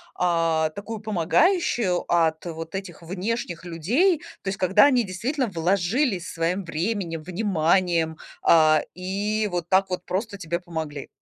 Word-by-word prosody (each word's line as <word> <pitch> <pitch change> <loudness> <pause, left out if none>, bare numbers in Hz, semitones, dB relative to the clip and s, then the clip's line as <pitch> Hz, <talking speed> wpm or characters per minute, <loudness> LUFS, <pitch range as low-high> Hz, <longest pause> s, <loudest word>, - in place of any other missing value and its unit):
а, 165 -3 +1
такую, 210 +5 -6
помогающую 215 - +2
от 160 -2 +2
вот 165 -1 -6
этих 190 -4 -6
внешних 180 0 -4
людей? 240 - +2 0.2
То - - -11
есть 195 - -3
когда 195 +5 +5
они 255 -4 +4
действительно 245 +9 -2
вложились 190 - 0
своим 175 +4 -1
временем, 170 0 -2
вниманием, 170 -3 +1 0.2
а, 155 -2 +5
и 205 +4 -1
вот 175 -1 -3
так 195 0 +3
вот 180 0 -2
просто 200 +2 -3
тебе 170 -1 -2
помогли. 160 -5 -6
180 Hz, 135 wpm, -24 LUFS, 165-210 Hz, 0.2 s, когда